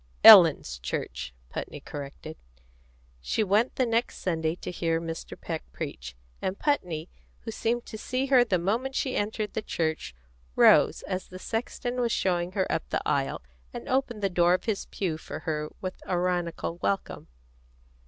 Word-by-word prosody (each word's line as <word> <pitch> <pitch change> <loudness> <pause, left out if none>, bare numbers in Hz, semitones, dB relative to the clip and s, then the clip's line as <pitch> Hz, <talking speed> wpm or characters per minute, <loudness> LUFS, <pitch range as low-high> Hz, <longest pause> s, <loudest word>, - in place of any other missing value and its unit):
"Ellen's 60 0 +9
church," - - -4 0.2
Putney - - -5
corrected. 145 +2 -8 0.9
She 140 - 0
went 210 +5 +2
the 255 - +2
next 230 0 0
Sunday 160 -2 -1
to - - -6
hear 165 -2 0
Mr. 165 -1 -6
Peck - - -4
preach, 60 0 -6 0.3
and 190 +1 -2
Putney, 180 - -1 0.3
who 225 - -6
seemed 235 +2 -1
to 220 - -8
see 255 +4 -1
her 260 -3 +6
the 200 -6 +1
moment 230 +10 -1
she 260 - -1
entered 210 0 -2
the - - -1
church, 160 - -2 0.4
rose, - - +5
as 185 0 -4
the 185 - -9
sexton 245 +4 -3
was 235 -1 +1
showing 180 -2 0
her 190 -2 +1
up - - -2
the - - -2
aisle, - - 0 0.3
and - - -7
opened 255 -5 0
the 195 - +3
door 175 0 +4
of - - -4
his 215 -3 -2
pew 165 -5 -3
for - - -7
her 150 -2 -2
with 185 -1 -5
ironical 175 -2 -1
welcome. 195 +2 -2
185 Hz, 165 wpm, -27 LUFS, 165-225 Hz, 0.9 s, Ellen's